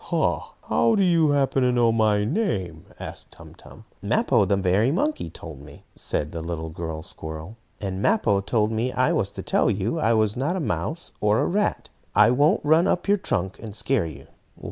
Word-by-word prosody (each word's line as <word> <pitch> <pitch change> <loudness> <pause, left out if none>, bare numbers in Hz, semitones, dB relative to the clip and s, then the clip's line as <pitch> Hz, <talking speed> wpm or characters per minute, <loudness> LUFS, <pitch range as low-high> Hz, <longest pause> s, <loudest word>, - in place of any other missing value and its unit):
"Ha! - - -1
How 225 - +2
do 200 - +3
you 165 -4 +3
happen 140 -1 +2
to 125 -1 +3
know 120 -2 +3
my 105 -2 +2
name?" 105 - -2
asked - - -7
Tum - - -14
Tum. - - -15 0.2
"Mappo, 100 - +2
the 100 +1 +1
merry 100 +6 +2
monkey, 300 - -1
told 75 -5 -10
me," 70 0 -14
said 75 +1 0
the 85 - -5
little 80 -1 -5 0.3
squirrel 80 0 -6
girl. 115 - -14 0.2
"And 95 -1 -4
Mappo 105 - +2
told 105 +1 0
me 115 +3 -1
I - - +1
was - - 0
to - - -7
tell - - +2
you 105 - -1
I 115 -6 +2
was 110 -1 +1
not 140 +8 -1
a - - -1
mouse 165 +1 -2
or 105 +1 +3
a - - +1
rat. 205 +3 -1 0.3
I 105 +3 +6
won't 150 - +2
run 160 +4 +4
up 180 - 0
your 205 +1 +4
trunk, 95 - -2
and 110 -3 -8
scare 120 -7 0
you." 70 -3 -10
110 Hz, 200 wpm, -24 LUFS, 95-155 Hz, 0.3 s, I